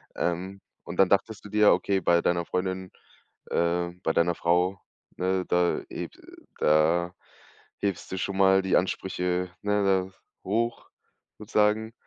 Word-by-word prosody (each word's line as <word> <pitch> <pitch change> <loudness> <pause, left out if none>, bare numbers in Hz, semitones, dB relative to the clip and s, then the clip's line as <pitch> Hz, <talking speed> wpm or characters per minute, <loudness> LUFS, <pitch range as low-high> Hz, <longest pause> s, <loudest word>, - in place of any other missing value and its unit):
Ähm, 95 +3 -2 0.2
und 85 - -8
dann 95 - +5
dachtest 105 +1 0
du 105 - -8
dir, 105 0 +5
okay, 100 -1 0
bei 85 0 +3
deiner 85 -1 0
Freundin, 95 +1 -3 0.6
äh 85 +1 +1
bei 80 - +1
deiner 85 0 +2
Frau, 90 +3 +1 0.4
ne? 95 0 0
Da 90 0 +1
heb - - -6 0.5
da 80 +3 +3 0.7
hebst 100 -4 -3
du 95 - -3
schon 95 +1 -3
mal 95 0 +5
die 95 -1 +2
Ansprüche, 90 -1 -1
ne, 105 0 +1
da 95 -1 +2 0.4
hoch, 115 +2 -1 0.5
sozusagen? 110 +1 +1
95 Hz, 140 wpm, -27 LUFS, 85-100 Hz, 0.7 s, dann